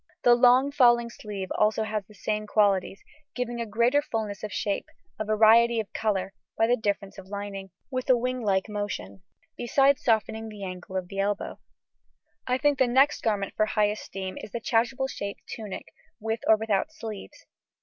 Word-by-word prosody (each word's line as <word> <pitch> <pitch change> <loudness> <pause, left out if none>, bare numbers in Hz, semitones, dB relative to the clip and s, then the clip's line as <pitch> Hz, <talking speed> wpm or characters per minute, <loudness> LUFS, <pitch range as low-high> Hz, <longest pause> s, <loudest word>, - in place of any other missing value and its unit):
The 245 - +7
long 250 +3 +5
falling 240 -4 +4
sleeve 200 -5 -6
also 215 +1 +3
has 215 -1 -2
the 210 - -17
same 215 0 -2
qualities, 200 -2 +1 0.3
giving 240 -1 -3
a 230 - -3
greater 235 +7 +3
fullness 220 -8 -4
of 210 - -4
shape, 200 -1 -2 0.3
a - - 0
variety 225 +2 +5
of 215 - -5
colour 195 -3 -1 0.2
(by 225 - +4
a 240 +2 +3
difference 200 -3 -3
of 190 - -12
lining), 200 -1 -6 0.2
with 255 0 -3
a 255 - +7
winglike 235 -6 0
motion, 195 - -5 0.3
besides 270 +3 +2
softening 220 -1 0
the 210 -2 -9
angle 185 0 -6
of 185 -1 -3
the 195 +2 -6
elbow. 205 +1 -2 0.9
I 250 0 +2
think 290 0 +2
the 260 - +4
next 270 +5 +3
garment 205 -4 -1
for 215 - +2
high 210 -1 +2
esteem 195 -2 -6
is - - -8
the 235 - -3
chasuble 240 +4 +1
shaped 200 -6 -6
tunic 215 -4 -7 0.3
(with 225 +1 -2
or 220 - +7
without 215 +5 -1
sleeves). 225 -1 -9
215 Hz, 175 wpm, -27 LUFS, 200-240 Hz, 0.9 s, The